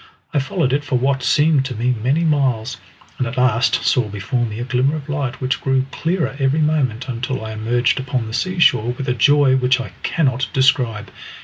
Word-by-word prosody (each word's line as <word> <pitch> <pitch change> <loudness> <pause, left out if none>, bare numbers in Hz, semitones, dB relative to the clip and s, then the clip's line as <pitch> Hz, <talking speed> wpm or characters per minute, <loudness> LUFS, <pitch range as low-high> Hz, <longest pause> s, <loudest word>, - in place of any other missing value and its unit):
I 145 - +2
followed 135 0 -1
it 145 +1 0
for 145 -3 -2
what 135 +2 0
seemed 150 +2 +3
to 130 -2 -5
me 120 +3 0
many 140 +8 +1
miles, 130 -7 0 0.4
and 130 - 0
at 115 - -6
last 125 -1 +2
saw 120 -4 +2
before 120 +5 -2
me 105 -1 -7
a 120 - -3
glimmer 130 +4 0
of 150 -2 -7
light 140 -4 -3
which 130 +1 -2
grew 135 -1 +1
clearer 165 -1 -2
every 135 +3 +1
moment 135 -6 0
until 125 -1 -4
I 110 - -6
emerged 120 +4 0
upon 130 -2 -2
the 110 - -7
sea 185 +9 -2
shore 125 -8 +3
with 135 +2 -6
a 125 - +1
joy 140 +2 +4
which 125 0 +2
I 130 - -6
cannot 130 -5 0
describe. 125 -6 +1
130 Hz, 205 wpm, -19 LUFS, 120-140 Hz, 0.4 s, joy